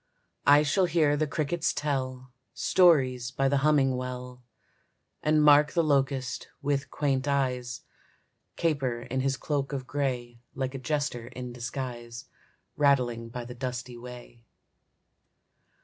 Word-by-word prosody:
I 145 +1 +7
shall 185 +6 +2
hear 160 -4 +2
the 155 +1 0
crickets 155 +2 -1
tell 130 -3 -3 0.2
Stories 130 -9 +3
by 135 +1 0
the 140 +1 +2
humming 135 -2 +3
well, 125 0 -6 0.8
And 155 0 +3
mark 150 0 +6
the 170 - +3
locust, 135 -3 0
with 140 -1 -1
quaint 140 -2 0
eyes, 125 -4 -1 0.7
Caper 135 -8 0
in 130 +1 -3
his 135 0 0
cloak 145 -1 -2
of 135 -2 -3
gray 125 -4 -3 0.2
Like 130 0 -2
a 135 - -5
jester 135 -3 -2
in 125 0 -7
disguise 120 -1 -6 0.5
Rattling 125 -5 +2
by 120 +1 -6
the 125 - -8
dusty 125 0 -5
way. 120 -1 -11
135 Hz, 130 wpm, -28 LUFS, 125-145 Hz, 0.8 s, I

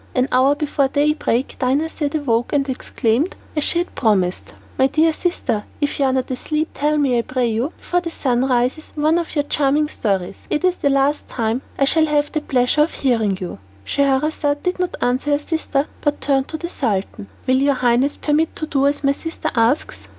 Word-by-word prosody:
An 255 0 +2
hour 265 +3 +4
before 290 -2 0
daybreak 285 -3 0
Dinarzade 290 +3 0
awoke, 240 -2 0
and 280 -1 +1
exclaimed, 255 +3 -1 0.2
as 300 - +1
she 340 - +1
had 350 +1 -1
promised, 190 -6 0 0.2
"My 265 - +5
dear 315 +4 +2
sister, 310 - -1 0.2
if 290 -1 -1
you 275 - +3
are 260 - +2
not 260 0 -1
asleep, 305 +5 -2
tell 300 +1 +1
me 265 -5 +2
I - - +3
pray 255 +1 -1
you, 230 +7 -1
before 355 0 -1
the 340 - -4
sun 255 -6 0
rises, 255 +4 0
one 310 +3 +2
of 335 - -5
your 290 - +2
charming 290 +1 +1
stories. 195 -8 -1
It 300 - -1
is 365 -1 +2
the 285 - +1
last 275 +2 +1
time 230 +1 -1 0.2
that - - +2
I - - +5
shall 315 +3 +3
have 295 -1 +1
the 310 - -1
pleasure 255 +1 +2
of 305 - +2
hearing 225 -7 +1
you." 180 - -6 0.3
Scheherazade 285 - +1
did 360 0 -1
not 360 -1 -2
answer 255 +4 +1
her - - +4
sister, 295 -2 -1 0.2
but 290 -1 0
turned 270 -1 +1
to 315 - -5
the 340 - -5
Sultan. 210 - -2 0.2
"Will 255 0 +3
your 280 +1 +2
highness 255 +3 +2
permit 310 +2 +1
me - - -28
to 310 - -3
do 280 -2 +1
as 285 0 -1
my 275 - +4
sister 325 +4 -4
asks?" 235 +5 0
280 Hz, 210 wpm, -20 LUFS, 250-300 Hz, 0.3 s, My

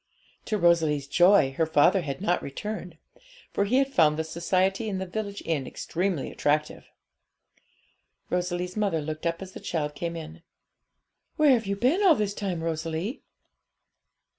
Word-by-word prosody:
To 215 - -1
Rosalie's 160 -6 +3
joy, 175 -1 +5
her 160 - +2
father 160 +5 +4
had 140 +2 -5
not 180 -3 +1
returned; 180 +3 -6 0.6
for 200 - +1
he 225 +5 0
had 270 0 +2
found 155 - +4
the 160 - 0
society 185 +6 0
in 195 - -2
the 190 - -3
village 200 +2 -5
inn 150 -6 -1
extremely 180 -4 -2
attractive. 150 +1 -1 1.4
Rosalie's 180 0 -2
mother 200 -6 0
looked 155 +2 -4
up 170 +3 -2
as 190 - -10
the - - -9
child 150 -3 -3
came 170 +3 -4
in. 165 +1 -8 0.9
'Where 305 -3 +5
have 230 -5 +2
you 200 - 0
been 255 - +2
all 370 -6 +6
this 205 -4 -1
time, 185 -5 -3
Rosalie?' 165 - -3
175 Hz, 155 wpm, -26 LUFS, 160-200 Hz, 1.4 s, all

